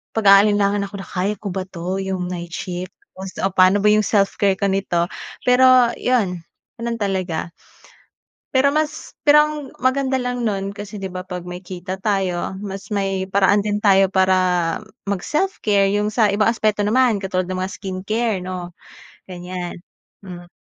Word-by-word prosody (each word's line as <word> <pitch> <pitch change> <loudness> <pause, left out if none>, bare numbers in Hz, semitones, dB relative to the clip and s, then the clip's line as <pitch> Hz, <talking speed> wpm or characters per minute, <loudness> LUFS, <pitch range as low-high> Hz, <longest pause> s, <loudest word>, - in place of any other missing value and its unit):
pag-aalilangan 200 -1 +4
ako 200 - -11
na - - -14
kaya 195 +3 -1
ko 210 - -6
ba 190 +1 -3
ito? 185 +1 -4
Iyong 190 -1 -3
night 170 -1 -6
shift 180 0 -6 0.2
o 190 - -5
so, 190 - -7
paano 185 +2 +5
ba 210 - +4
iyong 215 -1 +3
self-care 200 -1 +2
ko 200 - +1
nito? 175 -3 0 0.4
Pero 250 -1 +5
iyon, 200 -9 0 0.4
ganoon 235 0 -2
talaga. 185 -4 -2 1.0
Pero 280 +2 +3
mas 305 0 -2
pero 300 0 +6
and 300 -2 -6
maganda 265 +1 +1
lang 245 -1 -3
nun 195 -2 -2
kasi 205 0 -8
'di 195 -1 -4
ba 185 - -4
pag 180 -1 -6
may 180 +1 -7
kita 185 +1 -7
tayo, 190 -3 -1
mas 195 0 -7
may 195 -2 -2
paraan 200 +1 +3
din 205 0 -1
tayo 195 -2 +4
para 190 0 +3 0.7
mag 200 -2 -2
self-care. 210 - +1
Yung 210 0 +1
sa 215 -2 +2
ibang 210 +2 +3
aspeto 215 -2 0
naman 225 0 +2
katulad 185 -1 -1
ng 185 0 -3
mga 190 +1 -3
skin 190 -2 -5
care 220 -2 0
'no, 180 -1 -6 0.6
ganyan, 180 0 -6 0.5
mm. 175 -2 -10
195 Hz, 165 wpm, -20 LUFS, 185-215 Hz, 1.0 s, pero